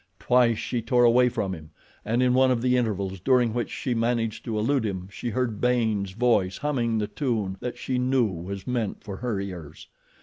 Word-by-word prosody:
Twice 125 -2 +3
she 120 +1 -2
tore 120 +2 +2
away 125 +1 +5
from 95 -5 -2
him, 80 -3 -9 0.3
and 115 +4 +1
in 125 -1 +3
one 130 +1 +4
of 125 -2 +1
the 125 0 +3
intervals 100 -6 -1
during 120 +2 +3
which 120 0 -2
she 125 - -3
managed 115 -1 -1
to 110 -2 -2
elude 130 +4 +1
him 95 -4 -3
she 120 - -4
heard 115 -3 -2
Baynes' 110 -6 +1
voice 105 -5 +1
humming 120 -6 0
the 105 - 0
tune 110 -7 -2
that 125 - -5
she 130 -1 -2
knew 130 -1 +2
was 95 0 -5
meant 120 -5 -2
for 100 -3 -6
her 115 -5 -2
ears. 90 -6 -8
115 Hz, 200 wpm, -26 LUFS, 100-125 Hz, 0.3 s, away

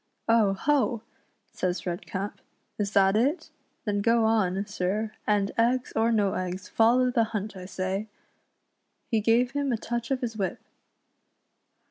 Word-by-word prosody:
"Oh! 225 -4 +4
ho!" 255 0 +1 0.5
says 185 +2 -2
Redcap, 190 +3 -4 0.4
"is 200 -1 -1
that 195 0 +4
it. 265 +10 +3
^ 320 - -18 0.4
then 205 -2 0
go 230 +1 +3
on, 200 -3 +1
sir, 210 +2 -2 0.2
and 205 -2 +2
eggs 245 +2 +1
or 225 +1 +3
no 205 -4 +2
eggs, 185 0 -4
follow 250 +3 +3
the 230 -2 +3
hunt, 215 -2 -4
I 185 -1 -8
say." 190 +3 -3 1.0
He 225 - +3
gave 235 +3 +3
him 285 -1 -1
a 235 - +1
touch 235 +1 -4
of 270 -2 0
his 230 -3 -3
whip. 195 -3 -2
215 Hz, 150 wpm, -27 LUFS, 195-235 Hz, 1.0 s, Oh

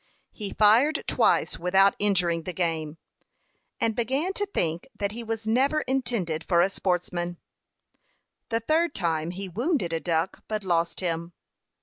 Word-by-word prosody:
He 205 -3 -5
fired 230 +9 +4
twice - - +2
without 190 +3 +4
injuring 180 -5 +1
the 180 +3 -5
game, 160 -3 -1 0.8
and 225 -1 +1
began 270 - -1
to 410 +1 -2
think 170 - -1
that 200 0 -1
he 235 +2 -6
was 225 -1 -4
never 270 +7 +2
intended 235 - -1
for 170 -1 +2
a 195 - 0
sportsman. 175 -2 -2 1.1
The 230 0 0
third 315 +5 +1
time 165 -3 -1
he 190 +2 -5
wounded 225 - -1
a 165 - 0
duck, 165 +1 -1
but 215 -1 -3
lost 170 -1 0
him. 170 -1 -2
195 Hz, 145 wpm, -26 LUFS, 170-235 Hz, 1.1 s, fired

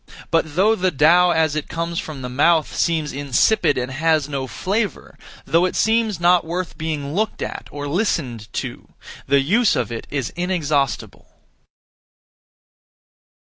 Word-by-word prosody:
But 160 -3 0
though 205 +5 +4
the 185 -3 +1
Tao 175 +4 +4
as 160 -3 +2
it 155 - -3
comes 170 0 -3
from 145 -5 -7
the - - -3
mouth, 150 +5 +2
seems 160 -3 0
insipid 145 - +2
and 125 +1 -2
has 155 +1 +1
no 135 -2 -3
flavour, 200 - -3 0.3
though 165 +5 +3
it 185 - -2
seems 220 -4 +1
not 175 0 +4
worth 175 +2 -4
being 150 -3 -4
looked 215 +4 -1
at - - -6
or 145 0 -6
listened 140 - -2
to, - - -6 0.3
the 140 0 +4
use 210 - +3
of - - -2
it 115 - -6
is 135 -4 -3
inexhaustible. 155 -6 -1
160 Hz, 145 wpm, -21 LUFS, 140-180 Hz, 0.3 s, though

